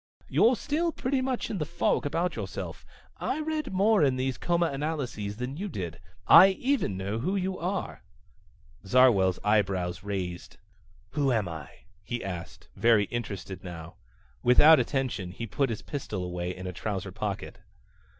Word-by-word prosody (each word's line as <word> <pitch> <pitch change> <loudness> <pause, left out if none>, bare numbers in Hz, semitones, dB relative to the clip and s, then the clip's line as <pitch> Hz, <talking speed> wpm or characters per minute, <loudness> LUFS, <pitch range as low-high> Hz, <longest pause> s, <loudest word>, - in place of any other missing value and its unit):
"You're 240 +3 +4
still 320 +9 -1
pretty 265 -2 -1
much 255 -1 -2
in 200 - -3
the - - 0
fog 170 -1 0
about 170 +5 -1
yourself. - - -6 0.3
I - - -2
read 310 -2 -2
more 200 0 +3
in 135 -3 +3
those 130 0 -2
comanalyses 145 -10 -1
than 125 +4 -4
you 200 +4 -3
did. 90 - -5 0.3
I 190 - +10
even 250 - 0
know 100 +4 -3
who 185 +11 -1
you 190 -1 -2
are!" 185 +4 -3 0.8
Zarwell's 100 -5 +4
eyebrows 95 -4 +1
raised. 95 -4 -5 0.5
"Who 140 +1 +1
am 110 -6 +1
I?" 80 -4 -7 0.3
he 120 - -4
asked, 90 -3 -7
very 115 0 +4
interested 100 -5 -5
now. 85 -2 -8 0.5
Without 145 +5 +7
attention 125 -7 -1
he 105 +6 -6
put 135 +4 0
his 110 - -4
pistol 110 -10 -4
away 90 0 -3
in 95 - -8
a 90 - -4
trouser 100 0 -4
pocket. 100 0 -5
120 Hz, 150 wpm, -28 LUFS, -, 0.8 s, I